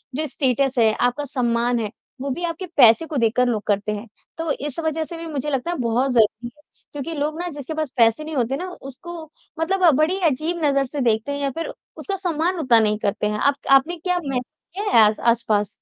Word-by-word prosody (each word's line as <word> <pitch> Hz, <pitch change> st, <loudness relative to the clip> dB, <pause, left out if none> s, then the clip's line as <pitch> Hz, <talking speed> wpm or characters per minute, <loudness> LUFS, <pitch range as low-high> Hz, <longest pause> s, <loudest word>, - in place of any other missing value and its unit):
जो 310 Hz, +3 st, -1 dB
स्टेटस 270 Hz, -2 st, 0 dB
है, 220 Hz, -1 st, +4 dB
आपका 245 Hz, +5 st, 0 dB
सम्मान 240 Hz, -2 st, 0 dB
है 215 Hz, -3 st, -3 dB, 0.3 s
वो 280 Hz, -, -3 dB
भी 275 Hz, +7 st, -4 dB
आपके 340 Hz, +2 st, -3 dB
पैसे 235 Hz, +3 st, +7 dB
को 305 Hz, -, -4 dB
देखकर 240 Hz, +1 st, +2 dB
लोग 225 Hz, -4 st, 0 dB
करते 205 Hz, +1 st, 0 dB
हैं, 210 Hz, +2 st, -5 dB, 0.3 s
तो 325 Hz, -1 st, -2 dB
इस 290 Hz, +1 st, -4 dB
वज़ह 320 Hz, -1 st, -1 dB
से 335 Hz, +2 st, -8 dB
भी 330 Hz, 0 st, -7 dB
मुझे 295 Hz, -2 st, -3 dB
लगता 275 Hz, +4 st, -1 dB
है 350 Hz, -, -3 dB
बहुत 245 Hz, +3 st, +1 dB
ज़रूरी 225 Hz, 0 st, +2 dB
है -, -, -22 dB, 0.3 s
क्योंकि 290 Hz, +3 st, -5 dB
लोग 305 Hz, +3 st, -2 dB
ना 355 Hz, -, -3 dB
जिसके 285 Hz, +2 st, -5 dB
पास 310 Hz, -2 st, -2 dB
पैसे 230 Hz, +4 st, +4 dB
नहीं 310 Hz, 0 st, -6 dB
होते 255 Hz, 0 st, 0 dB
ना 365 Hz, +3 st, -5 dB
उसको 275 Hz, +6 st, -9 dB, 0.5 s
मतलब 365 Hz, +2 st, +3 dB
बड़ी 330 Hz, +5 st, +2 dB
अजीब 325 Hz, +5 st, -2 dB
नज़र 275 Hz, -1 st, +3 dB
से 275 Hz, +2 st, -4 dB
देखते 230 Hz, +2 st, +1 dB
हैं 285 Hz, -, -3 dB
या 280 Hz, -1 st, 0 dB
फ़िर 330 Hz, +5 st, -5 dB, 0.2 s
उसका 395 Hz, -, -3 dB
सम्मान 355 Hz, -1 st, -1 dB
उतना 250 Hz, -7 st, +5 dB
नहीं 210 Hz, -1 st, +2 dB
करते 205 Hz, +1 st, 0 dB
हैं। 210 Hz, 0 st, -2 dB
आप 280 Hz, +4 st, +3 dB, 0.2 s
आपने 275 Hz, +6 st, +5 dB
क्या 360 Hz, +2 st, -1 dB
महसूस 255 Hz, -2 st, -1 dB, 0.3 s
किया 410 Hz, +1 st, -1 dB
है 225 Hz, -2 st, +8 dB
आस 210 Hz, 0 st, +1 dB
आसपास? 225 Hz, -3 st, +1 dB
275 Hz, 225 wpm, -22 LUFS, 235-320 Hz, 0.5 s, है